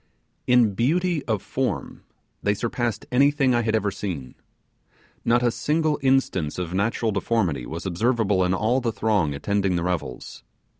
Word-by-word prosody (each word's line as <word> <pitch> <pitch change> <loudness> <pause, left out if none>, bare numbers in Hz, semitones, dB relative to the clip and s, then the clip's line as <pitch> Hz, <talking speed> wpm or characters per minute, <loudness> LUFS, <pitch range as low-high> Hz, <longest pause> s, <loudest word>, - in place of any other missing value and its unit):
In 125 -4 +4
beauty 160 - +1
of 110 -4 -1
form - - -3 0.4
they 100 0 +1
surpassed 115 0 -2
anything 140 0 +3
I 120 - +2
had 110 -1 0
ever 105 -2 0
seen. 85 -11 -5 0.9
Not 120 +1 +3
a 120 - +3
single 155 +3 0
instance 130 - +1
of 90 -1 -4
natural 110 +3 0
deformity 95 - -1
was 85 +4 -6
observable 100 0 +1
in 90 +1 +1
all 115 +7 +1
the 120 -2 0
throng 100 -8 0
attending 100 +4 0
the 85 - -1
revels. 85 -11 -4
110 Hz, 150 wpm, -24 LUFS, 95-125 Hz, 0.9 s, In